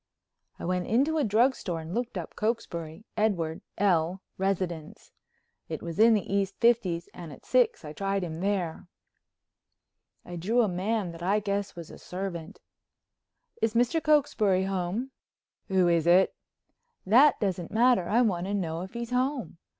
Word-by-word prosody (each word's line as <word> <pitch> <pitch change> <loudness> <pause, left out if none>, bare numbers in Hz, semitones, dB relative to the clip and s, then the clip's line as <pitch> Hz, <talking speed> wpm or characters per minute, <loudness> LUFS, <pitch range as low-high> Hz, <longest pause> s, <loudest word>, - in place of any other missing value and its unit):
I - - -7
went 180 0 -1
into 285 +8 +2
a - - +2
drugstore 220 -6 +1
and 160 +2 -7
looked 240 -2 -2
up 170 - -6
Cokesbury—Edward 180 -4 -2 0.2
L., 185 -2 +1 0.2
residence. 185 -5 -3 0.6
It - - -5
was 170 +1 -6
in 225 +1 +7
the 210 - -1
East 195 -1 0
Fifties 210 -8 +2
and 170 -3 -9
at 135 - -13
six 250 -9 +2
I 150 - -7
tried 195 +2 -1
him 160 -2 -5
there. 185 -4 -2 1.4
I 175 0 -7
drew 225 +8 +2
a - - +2
man 190 +1 -1
that 165 0 -11
I 195 +4 +2
guess 200 -1 -2
was 170 -2 -9
a - - -12
servant: 180 -3 -6 1.0
"Is 225 0 +1
Mr. 245 +7 +2
Cokesbury 260 - +3
home?" 195 +7 -2 0.6
"Who 190 -2 +3
is 170 -1 +2
it?" 180 +2 +5 0.7
"That 255 +10 +6
doesn't 185 -4 -2
matter. 230 -5 +3
I 235 +4 +4
want 185 -5 0
to 200 - -1
know 165 -4 -2
if 190 +3 -8
he's 235 0 -5
home." 250 - -1
195 Hz, 155 wpm, -28 LUFS, 175-230 Hz, 1.4 s, in